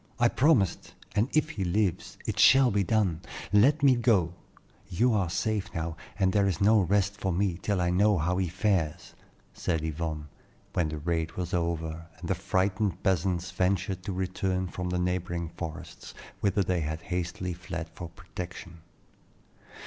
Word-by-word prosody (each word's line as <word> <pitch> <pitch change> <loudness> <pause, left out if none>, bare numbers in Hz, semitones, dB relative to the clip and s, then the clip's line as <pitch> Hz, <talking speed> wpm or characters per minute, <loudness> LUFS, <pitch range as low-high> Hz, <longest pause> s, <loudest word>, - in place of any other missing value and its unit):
I 120 -1 +4
promised, 125 - +2 0.2
and 110 +5 +2
if 155 0 +2
he 100 - -3
lives, 90 0 -1
it - - -3
shall 135 -1 +7
be 100 0 +2
done. 95 -5 +1 0.3
Let 140 +9 +5
me 135 -2 +6
go; 105 -9 +2 0.6
you 115 +7 +2
are 100 -5 +1
safe 105 +3 -1
now, 80 0 -2 0.2
and 95 -2 +2
there 100 -1 +3
is 90 -4 -1
no 110 +2 +5
rest 100 +2 +1
for 95 -2 -1
me 90 -1 0
till 100 -3 0
I 90 0 +1
know 100 +2 +4
how 90 +3 0
he 95 -1 +1
fares," 90 -3 -1 0.4
said 80 -2 -1
Yvonne, 80 -1 -3 0.5
when 85 -3 +1
the 80 - -4
raid 80 +1 -1
was 90 -1 -4
over, 85 -1 -2
and 85 - -7
the 95 - +2
frightened 95 +2 0
peasants 90 -1 0
ventured 95 0 0
to 100 - -2
return 95 0 -1
from 90 0 -4
the 90 - -1
neighboring 90 -1 -1
forests, 80 -1 -8 0.2
whither 100 0 +2
they 90 -1 0
had 80 +2 -4
hastily 90 0 -3
fled 85 -1 -6
for 85 0 -7
protection. 85 -1 -8
90 Hz, 165 wpm, -28 LUFS, 85-100 Hz, 0.6 s, shall